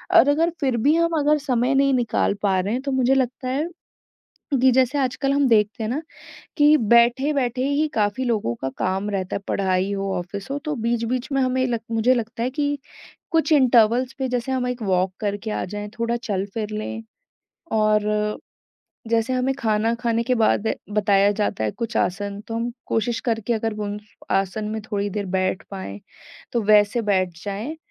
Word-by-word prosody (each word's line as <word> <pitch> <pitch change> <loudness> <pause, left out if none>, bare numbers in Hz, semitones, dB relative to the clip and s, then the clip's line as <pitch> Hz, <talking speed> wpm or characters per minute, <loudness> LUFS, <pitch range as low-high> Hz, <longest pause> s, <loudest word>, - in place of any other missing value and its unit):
और 335 - +8
अगर 325 +4 +3
फिर 260 -5 +1
भी 290 +8 +3
हम 335 -1 +2
अगर 300 +1 +3
समय 260 -2 0
नहीं 275 0 +3
निकाल 235 -4 +1
पा 190 -2 +2
रहे 200 +4 -1
हैं, 255 - -1
तो 275 0 -3
मुझे 260 0 +3
लगता 255 0 -1
है 285 +6 -1 0.9
कि 260 - +6
जैसे 260 +2 +2
आजकल 275 +1 0
हम 280 -1 +3
देखते 220 0 +2
हैं 215 - -2
ना 285 +6 -2 0.6
कि 295 +1 +6
बैठे-बैठे 245 +3 +3
ही 300 +2 +1
काफ़ी 210 +4 0
लोगों 215 - 0
का 135 - -1
काम 190 +2 -1
रहता 190 -2 -2
है, - - -1
पढ़ाई 190 0 0
हो, 195 0 -2
ऑफिस 195 +5 -7
हो, 280 - -1
तो 305 -1 -3
बीच-बीच 240 +3 -1
में 275 - +1
हमें 255 0 +1
लग 235 -2 -1
मुझे 225 +3 +3
लगता 230 -1 -3
है 250 - 0
कि 290 0 -1 0.5
कुछ 325 0 +2
इंटरवल्स 250 -2 +4
पे 265 - -1
जैसे 250 +1 -2
हम 255 -1 0
एक 250 -1 -4
वॉक 185 -2 +1
करके 205 +1 -3
आ - - -2
जाएँ, 205 +2 -6
थोड़ा 230 +1 0
चल 205 -6 -2
फिर 215 -2 -3
ले 215 +1 -4 0.8
और 210 0 +1 0.7
जैसे 230 +2 +1
हमें 255 +1 +1
खाना 220 -1 +1
खाने 230 -1 +1
के 250 +2 +1
बाद 220 -1 +2 0.2
बताया 200 -1 +3
जाता 205 - -1
है, 105 - 0
कुछ 230 - -5
आसन 200 +3 -1
तो 225 - -4
हम 235 +1 -1 0.2
कोशिश 235 +2 -1
करके 225 0 0
अगर 225 -1 -1
वो 210 0 -4
उन 205 +1 -4 0.4
आसन 195 +3 -4
में 220 0 -3
थोड़ी 205 0 -1
देर 200 0 -3
बैठ 185 0 -1
पाएँ, 145 - -7 0.5
तो 235 -2 +1
वैसे 210 +2 +4
बैठ 185 -5 0
जाएँ 210 +10 -4
230 Hz, 190 wpm, -23 LUFS, 205-260 Hz, 0.9 s, और